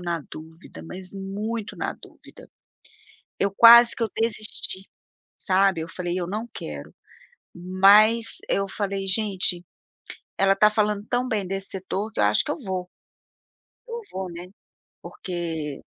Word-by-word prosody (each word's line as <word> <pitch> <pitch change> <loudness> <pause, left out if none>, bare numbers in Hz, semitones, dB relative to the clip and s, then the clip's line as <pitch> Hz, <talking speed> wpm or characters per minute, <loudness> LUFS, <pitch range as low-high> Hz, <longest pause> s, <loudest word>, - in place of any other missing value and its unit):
na 170 -2 -3
dúvida, 160 +2 -12
mas 185 +2 -8
muito 205 +3 -5
na - - -3
dúvida. - - -16 0.9
Eu 200 - +1
quase 235 +1 +8
que - - -9
eu 225 - -2
desisti, 215 -3 -2 0.5
sabe. 190 -2 +2
Eu 160 - -5
falei: 175 +1 -4
"Eu 175 - -3
não 215 +5 -4
quero", 75 -2 -8 0.6
mas 200 +6 +4
eu 195 0 0
falei: 195 -1 -3
"Gente, 190 -3 +1 0.8
ela 195 0 +4
está 210 +2 +4
falando 210 -1 0
tão 245 +1 0
bem 210 -5 -1
desse 195 +1 -4
setor, 195 +3 -4
que - - -3
eu - - +4
acho 105 +1 +3
que - - -5
eu 295 - -3
vou, 185 -5 -4 1.0
eu 470 0 -5
vou, 190 -1 -5
né", 170 +1 -8 0.6
Porque 165 -5 -5
195 Hz, 145 wpm, -24 LUFS, 180-215 Hz, 1.0 s, quase